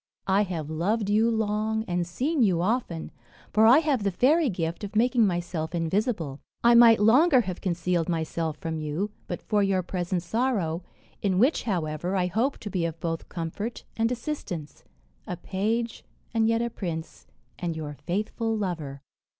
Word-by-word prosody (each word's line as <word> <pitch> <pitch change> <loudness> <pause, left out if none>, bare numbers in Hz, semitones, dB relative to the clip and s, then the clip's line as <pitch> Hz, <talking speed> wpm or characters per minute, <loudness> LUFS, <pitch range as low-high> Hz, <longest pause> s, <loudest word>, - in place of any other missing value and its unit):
I 195 +1 +3
have 165 -5 -4
loved 200 +7 0
you 220 +2 +4
long, 220 0 0
and 175 -1 -1
seen 270 - 0
you 190 -7 +3
often, 180 -4 -1 0.4
for 220 +1 +6
I 245 +5 +8
have 300 -6 +2
the 200 - +1
fairy 275 - +3
gift 170 -1 -3
of 205 +1 -6
making 235 0 +4
myself 175 -2 -2
invisible. 165 - -1 0.2
I 235 0 +6
might 235 -2 +8
longer 255 +6 +6
have 185 -5 -5
concealed 175 -2 0
myself 160 -1 -2
from 160 0 -4
you, 155 +7 -2 0.2
but - - -5
for 210 -2 +1
your 195 -2 +2
present 175 0 -2
sorrow, 195 -5 0 0.4
in 190 -3 +1
which, 255 - +3
however, 175 -2 -1
I 185 -2 +2
hope 225 +10 0
to 210 - -5
be 180 -2 0
of 165 -1 -3
both 165 0 -3
comfort 185 +7 -4
and 225 +1 +1
assistance 230 - -5 0.4
a 180 - -4
page 220 +6 -2 0.3
and 225 -1 +3
yet 230 +1 +2
a 235 - -2
prince, 165 -6 -6 0.3
and 170 -2 -2
your 150 -2 -5
faithful 220 +4 -1
lover." 155 -9 -4
195 Hz, 165 wpm, -27 LUFS, 170-225 Hz, 0.4 s, I